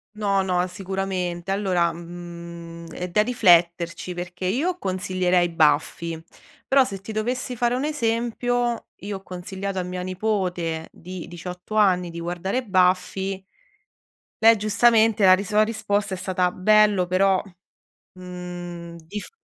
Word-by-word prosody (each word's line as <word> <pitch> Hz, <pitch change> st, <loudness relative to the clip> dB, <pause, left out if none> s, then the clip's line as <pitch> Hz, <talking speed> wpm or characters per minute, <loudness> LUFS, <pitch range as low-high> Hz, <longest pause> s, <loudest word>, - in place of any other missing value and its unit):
No, 200 Hz, -2 st, +1 dB
no, 180 Hz, -1 st, +1 dB
sicuramente. 185 Hz, -1 st, -3 dB
Allora, 185 Hz, -4 st, +1 dB
mhmm, 170 Hz, 0 st, -9 dB
è 180 Hz, +2 st, -5 dB
da 190 Hz, +5 st, +3 dB
rifletterci 175 Hz, -6 st, +3 dB
perché 180 Hz, +1 st, -6 dB
io 295 Hz, -, 0 dB
consiglierei 185 Hz, -1 st, +1 dB
Buffy, 165 Hz, +1 st, +1 dB, 0.5 s
però 270 Hz, 0 st, +5 dB
se 195 Hz, -6 st, -5 dB
ti 205 Hz, -, -7 dB
dovessi 245 Hz, +3 st, -2 dB
fare 240 Hz, +1 st, +1 dB
un 260 Hz, +3 st, -1 dB
esempio, 240 Hz, -3 st, -1 dB
io 200 Hz, 0 st, -4 dB
ho -, -, -14 dB
consigliato 190 Hz, +2 st, -5 dB
a -, -, -1 dB
mia 180 Hz, 0 st, -5 dB
nipote 180 Hz, -4 st, -2 dB
di 180 Hz, 0 st, -8 dB
18 180 Hz, +4 st, -8 dB
anni 185 Hz, -4 st, +3 dB
di 170 Hz, 0 st, -7 dB
guardare 175 Hz, +8 st, -2 dB
Buffy. 190 Hz, -1 st, +1 dB, 1.0 s
Lei 225 Hz, +1 st, +8 dB
giustamente 220 Hz, +1 st, +3 dB
la 185 Hz, -, +9 dB
ris 195 Hz, +1 st, 0 dB
la 210 Hz, +1 st, +5 dB
risposta 210 Hz, -2 st, -1 dB
è -, -, -3 dB
stata: 180 Hz, -1 st, 0 dB
"Bello 210 Hz, -1 st, +4 dB
però". 190 Hz, +1 st, +3 dB, 0.7 s
Mhmm, 175 Hz, -2 st, -8 dB
dif 205 Hz, +5 st, -6 dB
185 Hz, 135 wpm, -24 LUFS, 175-210 Hz, 1.0 s, la